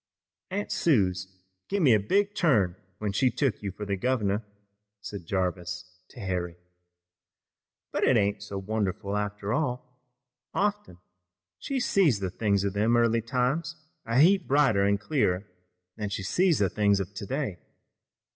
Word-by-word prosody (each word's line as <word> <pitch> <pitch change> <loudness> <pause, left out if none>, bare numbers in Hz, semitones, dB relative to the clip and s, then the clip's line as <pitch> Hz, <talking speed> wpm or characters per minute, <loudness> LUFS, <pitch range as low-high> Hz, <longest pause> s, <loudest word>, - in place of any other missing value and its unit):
"Aunt 200 +2 -3
Suse 95 - +2 0.4
give 200 -2 0
me 130 -6 +6
a 105 - +5
big 200 - +1
turn 110 - +2 0.2
when 105 -2 -2
she 125 +6 +2
took 135 -2 -1
you 100 - -3
fur 105 +3 -7
the 100 -1 -1
governor," 105 -1 0 0.6
said 100 -4 -8
Jarvis 90 -1 -2 0.2
to - - -13
Harry, 90 -3 -3 1.4
"but - - -1
it - - +5
ain't 100 0 +1
so 100 0 -6
wonderful 100 -1 -2
after 105 0 -2
all. 125 -3 -3 0.5
Often 205 - -1 0.6
she 275 -1 -2
sees 180 - +3
the 95 -2 -3
things 100 0 +1
of 100 -1 -1
them 110 +4 +2
early 115 -1 +3
times 130 +6 -1 0.3
a 115 +1 -1
heap 185 +3 +5
brighter 135 -9 +3
an' 100 0 +3
clearer 105 -5 0 0.5
than 105 -2 -3
she 100 -1 -4
sees 175 - +2
the 100 - +3
things 100 -2 +2
of 95 +1 -4
today. 105 -1 -3
105 Hz, 150 wpm, -27 LUFS, 100-135 Hz, 1.4 s, me